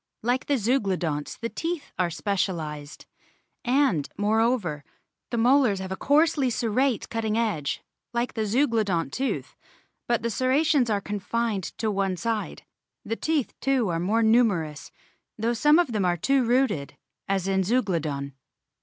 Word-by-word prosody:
Like 245 +3 0
the 285 - +2
Zeuglodonts 190 - -1
the 230 - -2
teeth 330 +1 -4
are 180 -1 +2
specialised; 160 -4 -3 0.6
and, 250 - +2
moreover, 210 - +1 0.5
the 240 - -2
molars 245 -2 +4
have 190 0 -6
a - - -1
coarsely 290 +1 +3
serrate 240 +2 0
cutting 225 -1 -1
edge 200 -11 -1 0.3
like 240 +1 -1
the 220 -2 -1
Zeuglodont 220 - +1
tooth, 270 +1 -2 0.5
but 235 -2 +1
the 235 - 0
serrations 260 +2 +2
are 205 -2 +1
confined 205 0 -2
to 220 -1 0
one 195 -2 0
side. 225 +1 -3 0.4
The 225 - -2
teeth 305 0 -1
too 260 -6 +1
are 165 -1 -1
more 215 +6 +1
numerous, 200 -10 +2 0.5
though 230 +2 0
some 295 +6 +5
of 345 -8 +2
them 210 -3 0
are 175 -1 +1
two 270 - +2
rooted 240 - +1 0.3
as 195 -1 0
in 190 0 +2
Zeuglodon. 165 - -1
220 Hz, 145 wpm, -26 LUFS, 185-250 Hz, 0.6 s, some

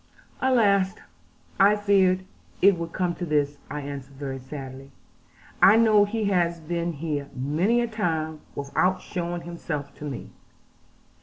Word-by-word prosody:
'Alas, 200 -7 +3 0.6
I 200 +2 +6
feared 190 -3 +3 0.3
it 200 0 +6
would 170 -1 -5
come 180 -1 -1
to 175 - -7
this,' 145 -3 0
I 145 +2 -4
answered 140 -1 -7
very 135 -1 -5
sadly; 135 0 -8 0.7
'I 200 - +8
know 215 -2 +5
he 215 +1 -2
has 175 -4 +1
been 170 +1 -2
here 145 -2 -3
many 160 - +1
a 235 - 0
time, 160 -8 -2
without 180 +7 +1
showing 175 -1 -4
himself 165 -4 -5
to 150 - -6
me. 140 -3 -6
170 Hz, 140 wpm, -25 LUFS, 145-195 Hz, 0.7 s, I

